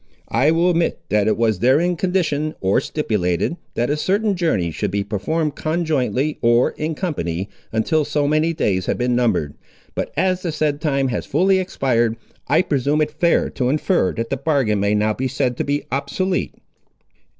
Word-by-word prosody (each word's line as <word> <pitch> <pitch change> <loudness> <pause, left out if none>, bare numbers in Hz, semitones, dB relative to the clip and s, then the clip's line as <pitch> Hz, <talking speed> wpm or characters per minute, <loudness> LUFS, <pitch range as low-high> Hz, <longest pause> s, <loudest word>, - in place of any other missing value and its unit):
I 130 +6 +3
will 170 +3 +3
admit 170 -1 0
that 105 -1 +2
it 110 - +2
was 110 -4 +1
therein 150 - +3
conditioned, 160 -4 0
or 95 +1 +2
stipulated, 105 - -1 0.2
that 120 +4 0
a - - +2
certain 200 +6 +1
journey 110 - 0
should 105 +6 -2
be 100 +1 -1
performed 145 - -1
conjointly, 155 -4 -1
or 120 +1 +3
in 155 +1 -3
company, 95 - -3 0.2
until 150 +8 +1
so 145 0 0
many 155 +2 +2
days 95 - -1
had - - 0
been 125 0 +1
numbered. 105 -12 +1 0.4
But - - -3
as 185 +2 +1
the 175 - -2
said 150 -1 -1
time 140 -3 +1
has 120 - -3
fully 190 +6 +3
expired, 120 -10 0 0.3
I 160 +6 +3
presume 145 0 0
it 150 0 +1
fair 170 +3 +1
to 125 -1 -1
infer 150 - +1
that 115 +2 -4
the 135 - 0
bargain 135 -7 +1
may 100 +1 +1
now 105 +1 +2
be 130 +4 -2
said 125 -1 -1
to - - 0
be 145 +1 -1
obsolete." 140 +8 -1
140 Hz, 180 wpm, -20 LUFS, 115-160 Hz, 0.4 s, I